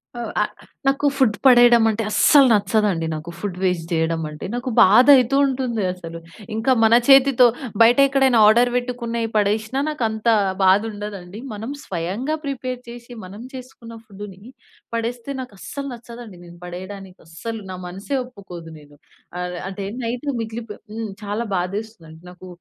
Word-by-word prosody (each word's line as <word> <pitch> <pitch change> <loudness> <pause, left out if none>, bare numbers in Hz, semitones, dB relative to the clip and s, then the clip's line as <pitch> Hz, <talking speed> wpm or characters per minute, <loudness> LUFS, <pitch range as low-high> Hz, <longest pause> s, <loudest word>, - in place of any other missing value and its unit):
ఆ! - - -6 0.2
ఆహ్, - - -1 0.4
నాకు 275 +2 +1
ఫుడ్ 255 -7 +2
పడేయడం 240 -2 +7
అంటే 220 +1 -2
అస్సలు 280 +4 +6
నచ్చదండి. 205 -4 +1
నాకు 155 +2 -6
ఫుడ్ 195 -3 -5
వేస్ట్ 180 -3 0
జేయడం 165 0 0
అంటే. 150 - -8
నాకు 245 +2 -3
బాధయితూ 255 +5 +6
ఉంటుంది. 250 -5 -2
అసలు. 165 -2 -9 0.4
ఇంకా 225 +4 +1
మన 220 +1 +5
చేతితో 270 -2 +6 0.3
బయటెక్కడైనా 265 +1 +5
ఆర్డర్ 240 +3 +4
వెట్టుకున్నయి 240 -2 -2
పడేసినా 215 +5 0
నాకంత 225 -6 -3 0.4
బాధుండదండి. 205 0 -1
మనం 220 +5 -6
స్వయంగా 195 - -3
ప్రిపేర్ 255 -2 -4
చేసి 240 +1 -11
మనం 200 +5 -10
చేసుకున్న 250 -3 -11
ఫుడ్డుని 195 -2 -11 0.5
పడేస్తే 235 +3 -4
నాకస్సలు 255 +4 -8
నచ్చదండి. 235 -4 -11
నేను 170 0 -14
పడేయడానికి 185 +1 -9
అస్సలు 220 +7 -7
నా 185 - -6
మనస్సే 195 +10 -4
ఒప్పుకోదు 185 -9 -11
నేను. 145 0 -18 0.4
ఆహ్, 180 0 -4
అంటే 195 +1 -6 0.2
నైటు 240 +5 -4
మిగిలిపో 225 -1 -6 0.2
హ్మ్, 225 -2 -5
చాలా 205 +3 -3
బాధేస్తదండి. 180 -3 -6
నాకు 180 +1 -13
220 Hz, 135 wpm, -21 LUFS, 185-245 Hz, 0.5 s, పడేయడం